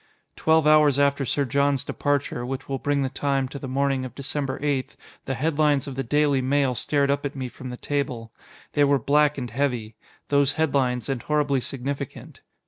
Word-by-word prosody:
Twelve 160 -1 +3
hours 150 -2 +5
after 140 -1 +2
Sir 140 +3 0
John's 140 +1 +1
departure 145 -4 -1
which 130 +2 -5
will 135 -1 -3
bring 145 -1 0
the 135 - -1
time, 135 -1 0
to 140 - -7
the 135 - -6
morning 135 0 0
of 130 - -7
December 140 -1 -3
8 140 -3 -1 0.3
the 135 - -2
headlines 150 0 +1
of 140 - -6
the 135 - -2
Daily 145 +1 +2
Mail 135 0 +2
stared 140 +3 +1
up 140 0 -1
at 145 0 -4
me 130 -2 -3
from 130 +1 -9
the 125 - -6
table. 125 -6 -3 0.4
They 145 - +3
were 140 0 +4
black 145 +4 +2
and 125 -4 -4
heavy: 120 -4 -1 0.4
those 140 -1 +3
headlines, 135 -6 0
and 135 -3 -2
horribly 145 -3 +1
significant. 135 +2 -6
140 Hz, 190 wpm, -24 LUFS, 130-145 Hz, 0.4 s, hours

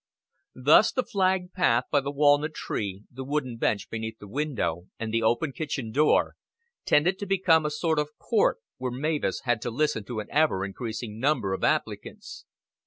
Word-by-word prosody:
Thus 145 +11 +5
the 255 - 0
flagged 185 -3 0
path 125 -10 +3
by 145 - +4
the 140 - -4
walnut 145 +2 +3
tree, 100 -1 -4
the 130 +1 -7
wooden 130 -3 -2
bench 105 -2 0
beneath 110 0 -5
the 105 - -12
window, 115 - -2
and 115 -1 -4
the 115 - +2
open 120 +6 +1
kitchen 140 -7 -4
door, 150 +5 +3 0.5
tended 175 +6 +3
to 200 - -5
become 175 -5 +3
a - - -1
sort 155 +1 0
of 150 0 -4
court 220 - +2 0.2
where 130 0 -2
Mavis 150 +4 -1
had 120 -3 0
to - - -3
listen 150 -2 0
to 120 0 -4
an 105 - -5
ever 145 -11 +2
increasing 110 +1 -6
number 130 -8 +1
of - - -4
applicants. - - -2
140 Hz, 175 wpm, -27 LUFS, 115-155 Hz, 0.5 s, Thus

